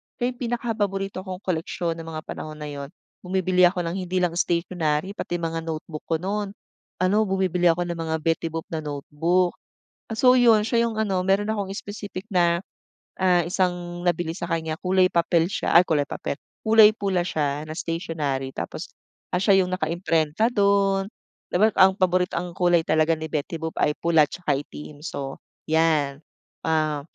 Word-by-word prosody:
siya 245 0 -1
yung 245 - -15
pinakapaborito 210 -6 -2
kong 185 +1 -6
koleksiyon 170 -1 -2
ng 165 - -8
mga 155 -1 -5
panahon 155 0 -7
na 150 -1 -7
yun. 140 -1 -6 0.3
Bumibili 185 -1 +3
ako 180 -1 -2
ng 170 +3 -3
hindi 185 0 -2
lang 175 - +2
stationary 170 0 0
pati 175 -3 -4
mga 165 -1 -2
notebook 155 -1 -6
ko 165 - +1
no'n 200 +1 -2 0.5
ano 185 +3 +3
bumibili 185 -2 +1
ako 175 +2 +2
ng 170 -1 -4
mga 160 - 0
Betty 165 0 0
Boop 165 0 -5
na 160 - -2
notebook. 160 +5 0 0.6
So 250 +2 +6
yun 230 -4 +5
siya 235 0 +2
yung 220 - -6
ano, 195 -4 +1
mayro'n 195 +2 +2
akong 200 -3 -3
specific 205 -2 -7
na, 170 -1 +3 0.6
ah, 180 -2 +4
isang 175 -1 -1
nabili 170 -1 0
sa 175 - -4
kanya 160 -1 -1
kulay 185 0 +4
papel 170 -1 +2
siya - - -1
ay, - - +8
kulay 145 -3 +1
papel, - - -4 0.3
kulay 220 -1 +7
pula 190 -5 0
siya 150 -2 -1
na 155 - -6
stationery. 155 -6 -3
Tapos - - -5 0.5
siya 190 +1 +4
yung 180 - -5
nakaimprenta 165 +2 +1
do'n, 200 -2 +2 0.4
di - - -1
ba 215 +2 +4
ang 190 0 +6
paborit 185 -1 +2
ang 175 0 -3
kulay 175 -2 +2
talaga 160 +1 +2
ni 160 0 -5
Betty 155 +2 -2
Boop 160 0 -4
ay 150 0 +2
pula 160 -3 +3
tsaka 175 -5 -2
itim 150 0 -10
so 135 -4 -6 0.2
yan, 155 -3 +1 0.5
ah, 155 -2 +1
175 Hz, 170 wpm, -24 LUFS, 160-190 Hz, 0.6 s, ay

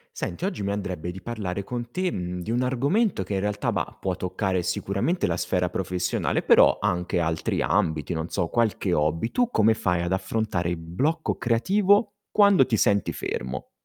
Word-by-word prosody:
Senti, 85 - -4
oggi 105 - -2
mi 100 - -1
andrebbe 90 -4 -4
di 95 - -10
parlare 100 -5 -4
con 120 +3 -5
te, 185 0 0
mhmm, 90 - -4
di 105 - -5
un 120 +2 +1
argomento 140 - +1
che 100 +2 -4
in 95 - 0
realtà, 105 +1 -1
bah, - - -3
può 95 -2 -1
toccare 95 0 -1
sicuramente 100 - -1
la 85 - 0
sfera 90 0 0
professionale, 90 -1 -1
però - - +5
anche 90 -3 0
altri 80 -1 -1
ambiti, 80 +2 0
non 80 0 -3
so 85 -4 -1
qualche 110 -4 0
hobby. 80 +7 +1
Tu 245 -1 +1
come 110 - +4
fai 90 -5 0
ad 85 - -2
affrontare 95 -2 -1
il 90 - -1
blocco 135 - -1
creativo 200 - +2 0.2
quando 200 -9 +5
ti 115 - +1
senti 100 -2 +2
fermo? 65 0 -5
100 Hz, 180 wpm, -25 LUFS, 90-120 Hz, 0.2 s, però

